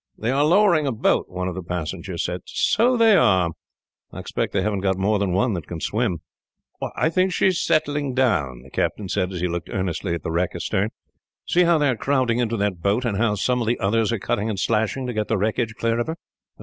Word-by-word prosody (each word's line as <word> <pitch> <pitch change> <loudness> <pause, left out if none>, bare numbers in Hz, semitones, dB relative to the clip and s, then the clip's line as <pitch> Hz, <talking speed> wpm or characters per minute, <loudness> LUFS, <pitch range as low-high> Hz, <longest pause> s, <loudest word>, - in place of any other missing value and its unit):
"They 115 +3 -1
are 140 +2 +2
lowering 170 -2 +4
a - - +1
boat," 110 - +1
one 90 0 -3
of 90 - -3
the 95 - -5
passengers 85 +1 -4
said. 90 0 -3
"So 240 +4 +2
they 225 -2 +6
are. 95 - +3 0.6
I - - -10
expect - - -3
they - - 0
haven't 105 -2 0
got 95 -1 0
more 100 +2 +1
than 100 -2 0
one 105 +6 +1
that 85 -5 -5
can 85 - -6
swim. 105 -4 -1 0.7
"I 160 - +1
think 185 +2 +2
she - - +1
is 185 -2 +2
settling 145 -3 0
down," 90 - +1
the - - -16
captain 100 -3 -2
said, 90 +1 -1
as 90 -2 -5
he 90 - +1
looked 85 0 -4
earnestly 90 -1 -2
at 85 - -7
the - - -3
wreck 85 +2 -1
astern. 100 +3 -1 0.6
"See 180 +1 +3
how 170 -1 +4
they 145 -2 +2
are 130 - +1
crowding 125 -1 +1
into 115 -1 0
that 100 -4 -1
boat, 105 +7 +1
and 105 -4 -1
how 110 -2 +2
some 125 +5 0
of 115 - -2
the 120 - 0
others 110 +3 +1
are 115 - 0
cutting 105 +2 -1
and 105 - -3
slashing, 110 +5 0
to 125 - -3
get 110 -1 -1
the 110 - +1
wreckage 110 +3 -1
clear 115 +1 0
of 120 - -1
her." 160 - -3
110 Hz, 240 wpm, -23 LUFS, 95-130 Hz, 0.7 s, they